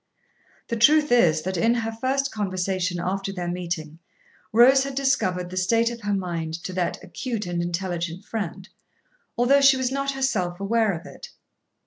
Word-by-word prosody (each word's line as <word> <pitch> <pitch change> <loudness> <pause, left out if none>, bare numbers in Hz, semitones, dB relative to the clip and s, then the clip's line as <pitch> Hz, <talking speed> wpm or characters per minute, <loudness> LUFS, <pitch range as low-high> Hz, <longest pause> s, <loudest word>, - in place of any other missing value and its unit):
The 235 - -1
truth 300 +6 +5
is, 165 -10 +4
that 190 0 -3
in 230 +7 +3
her 225 -1 -2
first 265 +4 -1
conversation 185 -3 -2
after 195 +2 -2
their 180 -3 -5
meeting 170 -3 -4 0.5
Rose 260 +4 +6
had 275 -1 -5
discovered 185 -10 0
the 185 - -6
state 230 +5 +2
of 235 -1 -8
her 205 -1 -1
mind 170 -4 -3
to 185 - -5
that 180 -1 -2
acute 235 -5 -4
and 175 -1 -2
intelligent 175 +1 -3
friend, 195 -4 -5 0.7
although 265 +4 +4
she 275 -1 +6
was 260 -1 -1
not 275 0 -1
herself 195 -10 -1
aware 220 +1 +1
of 170 +2 -7
it. 485 - -11
195 Hz, 165 wpm, -24 LUFS, 180-245 Hz, 0.7 s, Rose